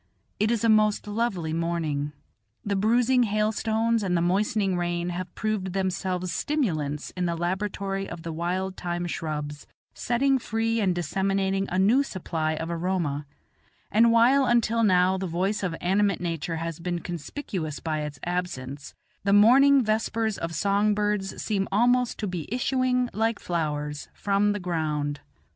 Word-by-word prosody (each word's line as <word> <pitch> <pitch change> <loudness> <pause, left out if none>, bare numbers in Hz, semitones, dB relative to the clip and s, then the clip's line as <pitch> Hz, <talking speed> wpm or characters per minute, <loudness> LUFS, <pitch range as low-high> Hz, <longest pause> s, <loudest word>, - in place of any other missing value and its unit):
It 215 - +2
is 235 -2 0
a - - +4
most 215 -1 +3
lovely 205 -7 -1
morning; 160 -3 -1 0.5
the 200 -1 0
bruising 240 +5 +3
hailstones 220 +1 +1
and 180 -3 +1
the - - +1
moistening 195 +1 +1
rain 175 0 -1
have 180 0 -5
proved 210 -4 -2
themselves 185 -2 -1
stimulants 155 - -1
in 180 -1 -1
the 170 - -1
laboratory 195 +2 -2
of 170 -1 -8
the 165 -1 -4
wild 185 +3 -2
thyme 175 0 -3
shrubs, 150 -3 -4 0.3
setting 265 +3 +1
free 225 0 -1
and 190 -4 +1
disseminating 195 +3 0
a 185 - -1
new 215 +8 +4
supply 165 - -2
of 165 +2 -4
aroma; 165 -5 -1 0.6
and 230 +2 +5
while 250 +4 +5
until 230 -1 +2
now 185 -2 +3
the 190 - -2
voice 190 +5 -1
of 180 -4 -2
animate 195 +1 +1
nature 165 -1 -3
has 165 0 -4
been 175 +1 -2
conspicuous 170 - -5
by 155 -2 -2
its 150 -1 -5
absence, 150 -6 -4 0.3
the 200 - +1
morning 265 +6 +6
vespers 220 0 0
of 165 0 -4
song 200 +4 +2
birds 210 -2 -1
seed 195 -3 -1
almost 245 +4 +2
to 215 - -3
be 180 -5 -4
issuing, 250 0 +1
like 225 +1 0
flowers, 150 -3 -3
from 200 +1 +1
the 205 - -3
ground. 155 -5 -2
190 Hz, 155 wpm, -26 LUFS, 170-215 Hz, 0.6 s, morning